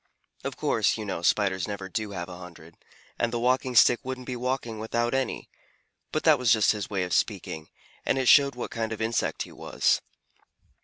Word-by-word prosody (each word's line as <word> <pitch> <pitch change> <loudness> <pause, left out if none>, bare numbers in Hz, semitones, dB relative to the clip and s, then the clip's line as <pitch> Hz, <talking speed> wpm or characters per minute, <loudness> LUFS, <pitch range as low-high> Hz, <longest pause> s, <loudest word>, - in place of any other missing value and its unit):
Of - - -4
course, - - +1
you 110 - -5
know, 95 -4 -3
Spiders 95 0 +1
never 100 -2 -5
do 110 +2 -3
have 85 -3 -5
a 90 -1 -9
hundred, 85 -2 -12 0.4
and 115 - +1
a 120 - -1
Walking 125 +1 +1
Stick 120 - +6
wouldn't 130 -1 -6
be 125 - -4
walking 125 -3 -3
without 120 +2 -1
any, 135 -2 -2 0.6
but - - -1
that - - +5
was 125 -4 +3
just 110 -2 +5
his 105 -2 -4
way 95 -3 -1
of 90 - -3
speaking, 80 0 -1 0.3
and - - +1
it 130 -1 0
showed 140 -1 +6
what 125 - -5
kind 115 -1 -2
of 110 - -7
insect 115 0 -1
he - - -12
was. - - 0
110 Hz, 200 wpm, -27 LUFS, 95-125 Hz, 0.6 s, Stick